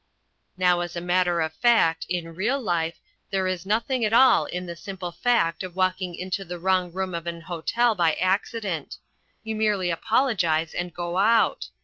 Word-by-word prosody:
Now 180 -1 +3
as 175 0 -4
a - - -2
matter 175 -1 +1
of 160 0 -2
fact, 165 -8 +3
in 170 -2 -3
real 225 +11 0
life, 170 -7 -1 0.3
there 195 -1 0
is 185 0 -3
nothing 230 +4 0
at 215 - +1
all 260 +3 +6
in 180 +1 -5
the 170 -1 -6
simple 185 -1 -7
fact 170 -6 +1
of 185 -2 -7
walking 185 -1 0
into 185 +2 -4
the 175 -1 -7
wrong 185 0 +1
room 190 +1 -3
of 170 0 -5
an 170 0 -4
hotel 185 +8 0
by 170 -5 +2
accident. 190 -3 -2 0.5
You 220 -1 -4
merely 210 -5 +1
apologise 170 - +1
and 175 0 -3
go 175 +2 -3
out. 225 +3 +3
185 Hz, 180 wpm, -25 LUFS, 170-205 Hz, 0.5 s, all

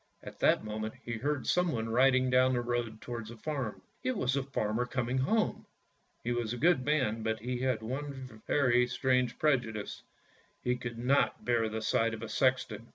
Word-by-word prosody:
At - - -10
that - - +4
moment 110 +1 -4
he 120 - -4
heard 145 +4 -1
someone 160 -11 +1
riding 130 +2 +4
down 130 0 +4
the 120 - +1
road 120 -2 -2
towards 120 -3 -6
the 115 - -10
farm. 135 -4 -4 0.2
It 255 -3 0
was 130 -7 +1
the 140 - +1
farmer 125 -3 -1
coming 125 0 -1
home. 215 +12 0 0.6
He 120 - -1
was 120 -2 -1
a - - -4
good 155 -1 +3
man, 130 -6 +1
but 110 0 -1
he 125 +1 -3
had 125 -4 0
one 130 -2 -6
very 125 -3 +3
strange 125 -1 +1
prejudice 120 -8 0 0.3
— - - -34
he 125 0 +1
could 125 -2 -6
not 130 +4 +1
bear 115 -2 +2
the 110 0 -4
sight 115 +1 +2
of 110 - -9
a 115 - -5
sexton. 125 -4 0
125 Hz, 190 wpm, -31 LUFS, 115-130 Hz, 0.6 s, that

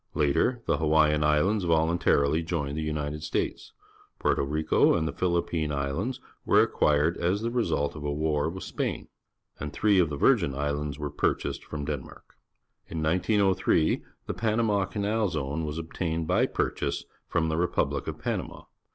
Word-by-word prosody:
Later, 80 - +1
the - - +1
Hawaiian 75 -1 +3
Islands 90 +8 +2
voluntarily 80 -2 +2
joined 80 -4 -2
the 80 0 -2
L^nited 75 0 -3
States; 75 - -3 0.5
Porto - - +1
Rico 75 +3 +2
and 80 -2 0
the - - -2
Philippine 85 -3 0
IslBnds 75 - -2 0.3
were - - +4
acquired 75 +3 +2
as 95 +5 0
the 115 - -1
result 85 - 0
of 75 - -7
a 75 - -1
war 75 0 0
witj|Hgin; 95 +2 -4 0.5
and 75 0 -4
three 105 +4 +3
of 85 -3 +3
the 75 - -4
Virgin 70 -1 +3
Islands 75 0 -2
wer^^i^jiased 75 -2 -1
from 75 -2 -6
Denmark. 70 -3 -7 0.5
In 80 -2 -4
1903 90 -1 +2 0.2
the - - -3
PaiiamoL'anal 105 -1 0
Zone 75 -1 -2
was 75 0 -4
obtained 80 0 -3
by - - +2
purchase - - -2 0.2
from 80 0 0
the 80 - -1
republic 90 +1 0
of - - -4
Panama. - - -4
80 Hz, 150 wpm, -27 LUFS, 75-90 Hz, 0.5 s, were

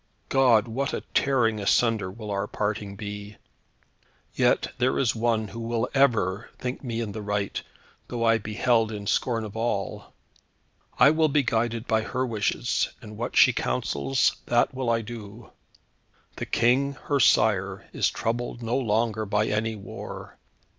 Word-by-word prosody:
God, 125 -5 +4
what 135 +5 -2
a - - -4
tearing 120 -6 +2
asunder 105 -1 +2
will 105 +2 -7
our 100 0 -1
parting 105 -1 -3
be! 105 0 -7 1.0
Yet - - +2
there 130 +1 +2
is 120 -5 +2
one 110 -2 0
who 115 - -8
will 115 +1 -1
ever 115 -7 +2
think 125 +2 -5
me 115 -3 -3
in 110 -3 -3
the 110 +1 -6
right, 105 -1 -2 0.5
though 120 -1 -3
I 115 0 +4
be 105 0 -7
held 115 -2 +2
in 105 -1 -6
scorn 115 +2 0
of 105 -1 -8
all. 110 -4 -3 0.8
I 140 - +7
will 160 0 +3
be 145 -1 +2
guided 115 0 0
by 110 -2 +2
her 125 +3 -2
wishes, 115 +1 0
and 105 -2 -11
what 120 +3 -4
she - - +7
counsels 70 -1 0
that - - +2
will 130 -2 -2
I 115 0 +2
do. 110 -1 -9 0.9
The - - -4
King, 130 +4 +2
her 145 -1 0
sire, 100 -5 +3
is - - +2
troubled 120 +1 -3
no 115 +3 0
longer 110 -2 0
by 105 +1 +1
any 110 +1 -1
war. 100 -2 -9
115 Hz, 160 wpm, -26 LUFS, 105-120 Hz, 1.0 s, I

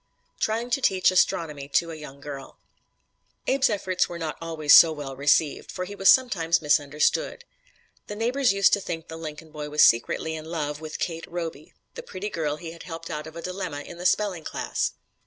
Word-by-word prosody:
TRYING 230 +3 -1
TO 275 - +1
TEACH 185 -5 +3
ASTRONOMY 155 -6 +1
TO 165 +4 +1
A - - -6
YOUNG 140 -3 -11
GIRL 140 -2 -8 0.9
Abe's 270 -1 +3
efforts 190 -3 0
were 175 - -6
not 160 -2 -4
always 160 -3 +2
so 165 - +9
well 145 -3 -6
received, 145 +2 +1
for 185 - -4
he 200 - -8
was 195 -1 +3
sometimes 180 -10 +4
misunderstood. 150 - +1 0.6
The 210 - -6
neighbors 245 +3 +2
used 195 0 +4
to 200 - +3
think 165 -3 -6
the 160 - -7
Lincoln 155 0 -8
boy 150 -1 -6
was 150 +1 +4
secretly 120 +7 +3
in 155 0 -7
love 150 -2 -4
with 155 -1 -6
Kate 165 -1 -4
Roby, 165 -4 -6 0.2
the - - -7
pretty 205 - -6
girl 150 -3 -1
he 165 +1 -8
had 170 - -12
helped 165 -1 -8
out 150 +1 -5
of 160 - -11
a 170 - -7
dilemma 180 -6 -4
in 170 +4 -11
the 180 - +2
spelling 185 -3 0
class. - - -2
165 Hz, 195 wpm, -25 LUFS, 150-190 Hz, 0.9 s, so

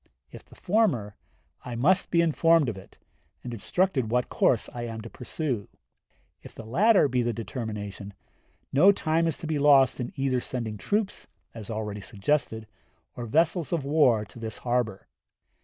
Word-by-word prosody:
If - - -11
the - - -19
former, 175 - 0 0.5
I 125 - -6
must 175 +11 +2
be 170 - +3
informed 165 -3 +3
of 110 - -4
it, 95 - -14 0.5
and 120 - -6
instructed 130 - 0
what 125 +1 0
course - - +2
I 120 - -5
am 110 -1 -6
to 115 - -10
pursue. 125 -3 -4 0.7
If - - -13
the 115 - -9
latter 195 - +4
be 125 -2 0
the 120 0 -1
determination, 105 -4 -6 0.6
no 170 +9 +7
time 165 -3 0
is 160 - -2
to - - -8
be 155 -2 -1
lost 140 -3 +5
in 120 - -4
either 135 -2 0
sending 115 -5 -5
troops, 205 - -2 0.3
as 110 -3 -9
already 105 -2 -4
suggested, 110 +2 -1 0.5
or 120 -1 -6
vessels 165 - +1
of 165 -5 0
war 135 -7 +3
to 120 - -13
this 110 -2 -5
harbor. 120 -5 -2
125 Hz, 165 wpm, -26 LUFS, 110-160 Hz, 0.7 s, no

